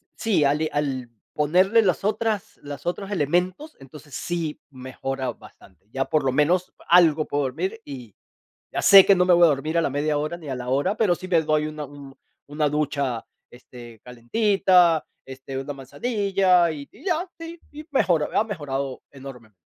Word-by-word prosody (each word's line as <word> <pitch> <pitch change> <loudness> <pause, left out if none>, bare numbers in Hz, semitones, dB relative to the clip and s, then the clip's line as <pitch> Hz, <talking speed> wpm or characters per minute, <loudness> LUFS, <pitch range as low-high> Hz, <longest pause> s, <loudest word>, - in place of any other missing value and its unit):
sí, 215 -9 +1
al 150 +3 +1
al 135 -4 -2 0.2
ponerle 185 +9 +3
las 185 -1 0
otras 215 0 -2
las 145 -1 -8
otros 195 +3 -3
elementos, 180 - -1
entonces 135 +1 -13
sí 170 -3 -4
mejora 130 0 -5
bastante, 95 -4 -19
ya 135 +1 -1
por 155 -2 0
lo 130 - +2
menos 175 +6 +1 0.2
algo 165 -3 +5
puedo 145 0 -1
dormir, 185 - -4
y 125 -7 -10 0.6
ya - - -2
sé 195 -1 +9
que 200 - +6
no 180 0 +2
me 180 - +4
voy 175 0 +5
a - - +6
dormir 155 +2 -1
a 170 - +3
la - - 0
media 145 +2 0
hora 155 +3 -3
ni 160 - -12
a 130 - -3
la 125 0 -6
hora, 145 +11 0
pero 205 -5 +3
sí 185 - -9
me 170 -3 +3
doy 155 0 0
una 155 -1 -6
un 140 -1 -13 0.3
una 150 +1 -1
ducha, 140 -5 -2 0.3
este, 120 -2 -13
calentita, 175 - +2 0.2
este, 135 0 -9
una 145 +1 -5
manzanilla 185 - +1
y 145 -2 -8
y 245 - -18
ya, 355 0 -1
sí, 330 0 -9
y 305 +1 -10
mejoró, 175 - +1
ha - - +4
mejorado 140 - -4
enormemente. 130 -6 -12
150 Hz, 180 wpm, -23 LUFS, 135-185 Hz, 0.6 s, sé